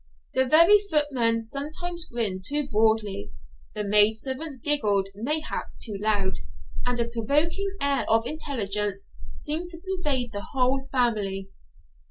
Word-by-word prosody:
The 260 0 +2
very 335 +9 +7
footmen 285 - +1
sometimes 310 +7 -4
grinned 215 -8 -2
too 290 +3 0
broadly, 215 -3 +1 0.4
the 210 - -2
maidservants 220 +8 +3
giggled 210 -8 +1
mayhap 295 +10 -2
too 215 -4 -1
loud, 205 -2 +1 0.5
and 245 -1 0
a 235 - +1
provoking 295 - 0
air 280 -1 +1
of 225 +1 +3
intelligence 210 -9 -2 0.2
seemed 320 +4 -4
to 340 - -6
pervade 300 -10 -1
the 205 0 -6
whole 265 +1 +1
family. 205 -6 0
245 Hz, 125 wpm, -26 LUFS, 210-295 Hz, 0.5 s, very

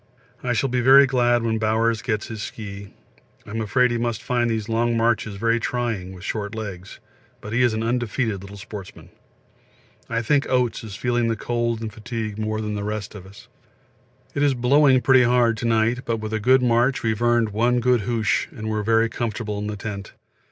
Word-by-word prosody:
I 125 -1 -1
shall 120 +4 +1
be 125 0 0
very 135 +3 +8
glad 120 -2 +2
when 110 -1 0
Bowers 110 +1 +1
gets 110 -3 -2
his 110 -3 -7
ski; 100 -2 -7 0.5
I'm 110 +1 -4
afraid 125 +3 +2
he 120 - -1
must 120 0 -2
find 120 -2 0
these 110 -2 -2
long 115 +1 +1
marches 115 -2 +1
very 115 +3 +1
trying 115 -6 -2
with 90 -1 -11
short 105 +1 -4
legs, 100 -4 -7 0.4
but 105 - -8
he 120 - +2
is 120 -3 +3
an 110 - -2
undefeated 115 -3 -1
little 100 +1 -10
sportsman. 100 -2 -10 1.0
I 115 0 -1
think 145 +3 +1
Oates 125 -3 0
is 105 -3 -8
feeling 120 0 0
the 115 - 0
cold 120 0 -2
and 110 -2 -5
fatigue 110 -1 -5
more 110 0 -2
than 105 -1 -3
most 105 0 -4
of 95 -3 -10
us. 100 +2 -15 0.9
It 140 - -2
is 145 -2 +3
blowing 130 +1 +4
pretty 130 +2 +5
hard 120 -1 +3
to 120 - -2
night, 115 +2 +2
but 115 -1 -1
with 110 0 -5
a 110 - 0
good 130 +4 +4
march 120 +2 +2
we 110 - +2
have 110 +1 -4
earned 120 -2 +3
one 120 +4 +1
good 125 -1 +2
hoosh 110 -1 0
and 110 0 -5
are 105 - -1
very 115 +2 +3
comfortable 110 -2 -4
in 105 - -4
the 105 -1 -4
tent. 100 -1 -6
115 Hz, 200 wpm, -23 LUFS, 105-120 Hz, 1.0 s, very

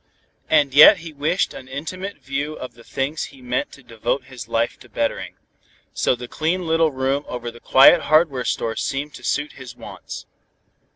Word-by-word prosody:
And 145 -4 +3
yet 155 +8 +9
he 165 -2 -9
wished 150 +6 0
an 130 - -10
intimate 185 +9 -6
view 140 +3 -4
of 130 -2 -8
the 120 0 -17
things 140 +6 -3
he 135 - -14
meant 125 0 -2
to 140 - -14
devote 120 +3 -2
his 130 -2 -10
life 115 +1 -1
to - - -16
bettering. - - -2 0.6
So - - +1
the 125 0 -8
clean 170 +7 -1
little 165 -1 +2
room 135 +2 -1
over 120 -1 -5
the 120 - -14
quiet 140 +8 +6
hardware 155 -5 +3
store 115 -1 -1
seemed 145 +2 -3
to - - -12
suit 145 +1 -1
his 130 -2 -11
wants. - - -9
140 Hz, 180 wpm, -22 LUFS, 125-155 Hz, 0.6 s, yet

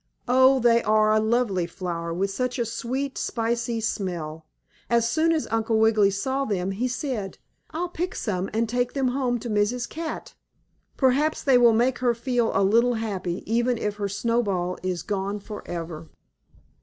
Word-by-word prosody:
Oh, 260 +2 +5
they 235 -1 +4
are 215 0 +3
a 215 - +4
lovely 220 -5 +1
flower, 170 -2 -4
with 195 +4 -1
such 250 +5 -2
a 240 - 0
sweet, 260 +4 -3
spicy 235 0 -1
smell. 170 -8 -3 0.4
As 235 -1 +3
soon 320 +6 +2
as 320 -2 0
Uncle 225 0 +1
Wiggily 220 -2 +4
saw 265 +8 -1
them 195 -6 -1
he 225 +6 -1
said: 250 -6 -4 0.3
"I'll 345 +3 -3
pick 355 +1 -3
some 190 -3 -2
and 225 +2 0
take 245 +2 -1
them 270 -2 +1
home 250 -1 0
to - - -5
Mrs. 225 +3 0
Cat. 320 -1 -6 0.6
Perhaps 280 +4 +2
they 265 -3 +5
will 235 -2 +6
make 240 +3 +2
her 240 -1 +2
feel 240 -1 0
a 195 - +3
little 235 +5 +3
happy, 195 -5 -3
even 235 +2 +1
if 210 -2 -3
her 200 -1 -2
Snowball 200 -4 -1
is 180 -3 -3
gone 200 +1 -2
forever." 170 -6 -7
225 Hz, 170 wpm, -25 LUFS, 195-250 Hz, 0.6 s, will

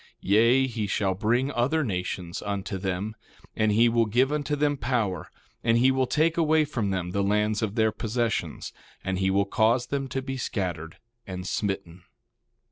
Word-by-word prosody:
1:11 - - -25 0.2
Yea, 115 +5 +5
he 110 -5 -3
will 95 -2 +1
bring 120 +8 +1
other 140 +6 +1
nations 90 -5 -3
unto 100 -1 -3
them, 95 +3 -3 0.4
and 110 -1 +2
he 115 +3 +5
will 115 -1 +2
give 125 +6 +2
unto 150 0 -1
them 145 0 +1
power, 115 - -1 0.3
and 115 0 +3
he 130 +3 +5
will 130 -1 +1
take 160 +6 +1
away 160 -1 +3
from 120 -8 -2
them 90 -2 -2
the 100 - 0
lands 105 +2 +1
of 110 -2 -2
their 110 -1 +3
possessions, 115 +2 -2 0.3
and 95 -1 -2
he 95 0 +2
will 100 +1 +2
cause 115 +4 +2
them 140 -1 -2
to 135 +1 -3
be 135 0 -4
scattered 85 -8 -3 0.3
and 90 -1 -6
smitten. 95 -5 -3
110 Hz, 180 wpm, -26 LUFS, 95-130 Hz, 0.4 s, Yea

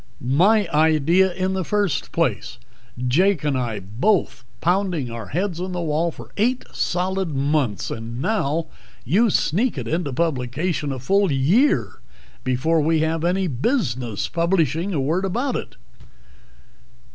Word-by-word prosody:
_ - - -28 0.2
My 195 - +4
idea 160 +4 +3
in 185 +1 -1
the 190 -1 -1
first 205 -2 -1
place. - - -1 0.5
Jake 180 +5 +2
and 145 -2 0
I 120 -5 -2
both 120 - 0 0.2
pounding 175 -7 0
our 115 -3 -6
heads 175 +1 -2
on 185 0 -4
the 175 - -2
wall 165 +1 0
for - - -11
eight 245 +5 +1
solid 185 -2 -1
months 140 -6 0
and 115 +1 -6
now 165 -3 0 0.4
you 205 - +3
sneak 205 - +1
it 120 -3 -4
into 160 -1 -1
publication 150 +2 -1
a 135 - -3
full 195 +8 +2
year 170 - +2 0.4
before 130 +6 +1
we 160 +1 +2
have 160 0 0
any 185 +2 +1
business 130 - -1
publishing 170 0 0
a 160 - -1
word 160 +8 0
about 240 +7 -1
it." - - -5
165 Hz, 145 wpm, -22 LUFS, 135-190 Hz, 0.5 s, My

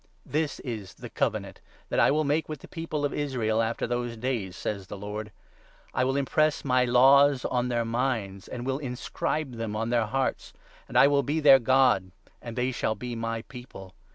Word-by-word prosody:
" - - -38 0.2
This 150 -3 -4
is 110 -7 -6
the - - -10
Covenant - - -2 0.3
that - - 0
I - - +5
will 155 +2 +2
make 150 +2 0
with 155 -3 -6
the - - -11
People 165 -3 -3
of 145 - -2
Israel 125 -7 -1
10 115 - +2
After 115 - -2
those 120 -1 -3
days," 110 -6 -3
says 100 -3 -4
the 100 - -7
Lord. 105 +1 -6 0.3
" - - -30
I 130 - +1
will 135 +1 0
impress 155 +2 +1
my 125 -1 +3
laws 135 +2 +5
on 125 0 0
their 120 -1 0
minds, 115 -5 -2
And 120 0 -6
will 135 +1 -1
inscribe 135 +1 -3
them 115 -2 -3
on 115 +2 -2
their 115 -3 +2
hearts; 135 +4 -2 0.3
And - - -2
I - - +8
will 140 0 +4
be 145 +4 -1
their 140 -3 +8
God, 125 -6 +3 0.3
And 115 -2 -7
they 125 +1 0
shall 110 -3 -1
be 125 0 -6
my 115 0 -3
People. 120 -8 -11
125 Hz, 210 wpm, -27 LUFS, 115-140 Hz, 0.3 s, I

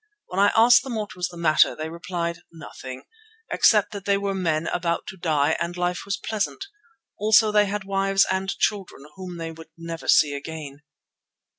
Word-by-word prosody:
When 180 - -3
I 200 +1 +5
asked 240 +2 +7
them 255 -2 -6
what 210 -2 -4
was 180 0 -2
the 175 - -12
matter 160 -2 +3
they 155 - -5
replied, 170 0 -4
"Nothing," 130 -5 -10 0.5
except 210 -2 +4
that 200 -2 -8
they 200 0 +2
were 200 0 -2
men 165 -4 -1
about 170 0 -1
to - - -8
die 155 -3 +1
and 175 +1 -3
life 180 0 -2
was 200 0 -2
pleasant. 220 - -3 0.5
Also 215 +1 +4
they 210 -1 +4
had 205 0 -3
wives 195 0 +2
and 190 0 -1
children 195 -9 -2
whom 185 -2 -8
they 165 -1 -5
would 165 0 -13
never 165 0 -7
see 145 -2 +5
again. 145 -1 -7
180 Hz, 180 wpm, -24 LUFS, 165-200 Hz, 0.5 s, asked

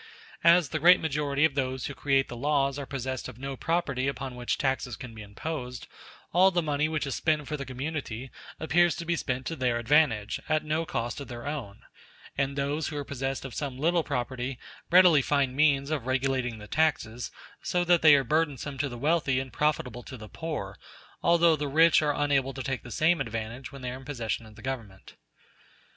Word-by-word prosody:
As 170 -3 +6
the 155 - -2
great 180 +4 +7
majority 145 -1 +1
of 160 - +1
those 130 -2 -2
who 140 - -4
create 135 -1 +1
the - - -7
laws 140 +1 +1
are 140 - -6
possessed 130 -1 -4
of 125 -3 -10
no 135 +1 -5
property 140 -4 -1
upon 135 -2 -3
which 125 -1 -2
taxes 130 -3 -1
can 125 -1 -9
be 110 - -9
imposed, 125 +4 -6 0.5
all 185 +3 +6
the 175 -2 0
money 150 0 0
which 155 -3 -1
is 140 - -3
spent 155 -3 0
for 150 - -2
the 140 -3 -6
community 130 -2 -5 0.3
appears 170 +3 +3
to 170 - -6
be 170 +1 +1
spent 130 -4 -3
to 165 - -3
their 125 -4 0
advantage, 120 -4 +2
at 155 0 +1
no 155 +2 -1
cost 120 +4 -3
of 140 - -7
their 120 -2 -8
own; 140 -9 -5 0.5
and 140 0 -1
those 140 +2 -1
who 150 - -5
are 145 - -2
possessed 135 0 -3
of 130 - -7
some 140 -4 -4
little 170 +4 +2
property 130 -2 -3 0.3
readily 175 -4 +7
find 135 -2 +1
means 140 -1 +3
of 140 -6 -2
regulating 130 -2 0
the 105 - -10
taxes 125 -5 0 0.3
so 180 0 0
that 175 -1 +4
they 155 -2 +8
are 135 - +3
burdensome 145 -1 -1
to 140 +1 0
the 120 - -7
wealthy 145 -1 +1
and 130 -1 -6
profitable 130 -5 0
to 130 +2 -9
the 110 -1 -10
poor, 105 - -5 0.4
although 170 -1 +5
the 150 -1 -3
rich 160 +3 +5
are 150 -1 +1
unable 135 -2 +1
to 130 - -4
take 135 -2 -2
the 120 - -11
same 160 +9 +2
advantage 115 +4 -5
when 140 -2 -10
they 125 - -3
are 125 - -6
in 135 - -12
possession 115 -5 -3
of 110 - -15
the 115 - -14
Government. 115 -8 -6
140 Hz, 210 wpm, -28 LUFS, 125-155 Hz, 0.5 s, they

